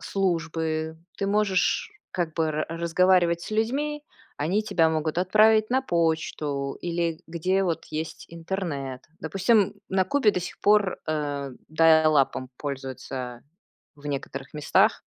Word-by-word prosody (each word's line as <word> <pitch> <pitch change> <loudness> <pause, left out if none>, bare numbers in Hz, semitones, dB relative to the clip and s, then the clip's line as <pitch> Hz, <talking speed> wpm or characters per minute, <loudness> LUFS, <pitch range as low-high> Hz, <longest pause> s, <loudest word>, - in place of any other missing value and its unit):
службы. 160 -4 -1 0.2
Ты 200 - -1
можешь 210 - +1 0.2
как 170 -4 -2
бы 160 -2 +1
ра 155 0 -1
разговаривать 170 +1 +2
с - - -7
людьми, 280 +8 -1 0.4
они 180 +9 +1
тебя 175 -6 +2
могут 160 +1 -1
отправить 215 +3 +4
на 260 +2 +2
почту 155 - -1
или 170 -2 -2
где 180 +4 0
вот 170 -3 -1
есть 155 +1 -5
интернет. 165 -7 -4 0.2
Допустим, 195 +5 +2 0.2
на 190 -1 +2
Кубе 250 -2 +3
до 180 - -2
сих 175 - -7
пор, 205 -2 +3
а, 145 -3 -2 0.2
даялапом 155 -5 +4
пользуются 130 -3 -6 0.5
в 145 - -17
некоторых 135 -1 -5
местах 150 -1 +3
165 Hz, 125 wpm, -26 LUFS, 155-195 Hz, 0.5 s, отправить